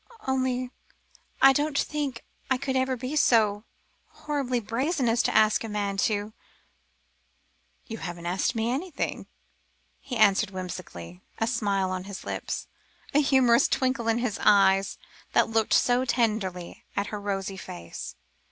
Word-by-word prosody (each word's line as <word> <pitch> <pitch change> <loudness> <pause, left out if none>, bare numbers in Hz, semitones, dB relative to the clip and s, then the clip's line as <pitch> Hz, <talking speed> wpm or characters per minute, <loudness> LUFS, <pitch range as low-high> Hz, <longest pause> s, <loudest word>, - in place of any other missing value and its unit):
"Only 255 -1 -1 0.7
I 270 0 +9
didn't 290 +1 0
think 285 -6 -2 0.2
I 260 - +3
could 265 0 -3
ever 260 0 +1
be 255 +5 -4
so 215 -6 +3 0.4
horribly 275 -5 -2
brazen 255 - -1
as 230 +1 +3
to - - -1
ask 215 +1 +4
a 225 - -5
man 205 -1 -2
to 205 +1 0 0.8
" - - -42
"You 225 -3 -7
haven't 175 -1 -6
asked 185 +7 0
me 225 +1 0
anything," 310 +5 -3 0.7
he 250 -3 -5
answered 210 -1 +4
whimsically, 175 - -7 0.2
a 225 - +1
smile 200 -5 0
on 185 0 -4
his 200 0 -8
lips, - - -4 0.5
a 290 - +5
humorous 260 -4 +4
twinkle 255 -3 0
in 225 +1 +2
the 220 -6 -1
eyes 195 -1 +4 0.4
that - - +3
looked 225 -1 +1
so 245 +1 +3
tenderly 210 -8 -1
at 200 - 0
her 210 - -4
rosy 195 -1 -3
face. 85 - -8
225 Hz, 145 wpm, -27 LUFS, 195-260 Hz, 0.8 s, I